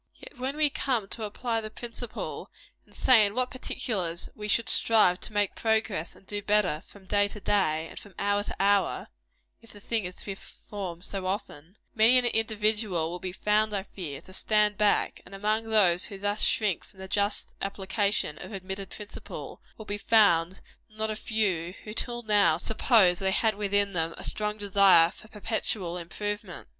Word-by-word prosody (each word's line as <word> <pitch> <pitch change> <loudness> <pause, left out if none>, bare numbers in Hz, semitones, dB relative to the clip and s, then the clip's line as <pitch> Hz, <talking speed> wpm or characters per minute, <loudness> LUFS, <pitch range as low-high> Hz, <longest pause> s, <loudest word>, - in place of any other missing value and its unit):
Yet, - - -14
when 265 +3 -3
we 300 -2 +3
come 250 -8 -1
to 225 - -4
apply 225 +2 -2
the 215 - -6
principle, 235 +1 -6 0.4
and - - -17
say 245 -4 +6
in 205 +1 0
what 255 0 0
particulars 190 -9 -3
we 210 0 -7
should 230 +2 +1
strive 210 -5 +3
to - - -7
make 205 -2 0
progress 220 -7 -1
and - - -20
do 205 +1 -4
better, 200 -7 +2
from 200 -2 -16
day 205 +1 +2
to 210 - -7
day, 165 -6 +1
and - - -9
from 200 -2 -15
hour 205 0 +1
to - - -5
hour, 200 0 +1 0.5
(if 230 - -18
the 205 - -13
thing 220 0 -1
is 180 0 -6
to - - -12
be 200 - -3
performed 190 -2 -8
so 195 -2 -4
often,) 190 -3 -5 0.2
many 230 +3 +6
an 250 - +3
individual 215 -6 +1
will 180 - -5
be 185 - -5
found, 210 +2 +1
I 195 - -1
fear, 160 -9 -7
to 185 - -14
stand 210 +1 +2
back; 210 -1 +1
and 195 - -12
among 215 +3 0
those 195 -6 +3
who 200 - -7
thus 205 +2 -2
shrink 210 -6 +1
from 190 - -20
the 190 - -7
just 205 +2 -1
application 195 -4 -1
of - - -8
admitted 190 0 -5
principle, 210 -1 -9 0.2
will 220 - -9
be 205 0 -4
found 190 -5 +3 0.3
not 215 0 -3
a - - -3
few 195 -6 -1
who, 210 - -7
till 240 +1 -2
now, 205 -7 +4
supposed 195 -2 +3
they 190 - +2
had 220 +3 +2
within 205 -1 +1
them 165 -1 0
a - - -6
strong 210 0 -1
desire 195 -4 +6
for 215 - -15
perpetual 210 -4 -2
improvement. 205 +2 -5
205 Hz, 190 wpm, -28 LUFS, 190-220 Hz, 0.5 s, say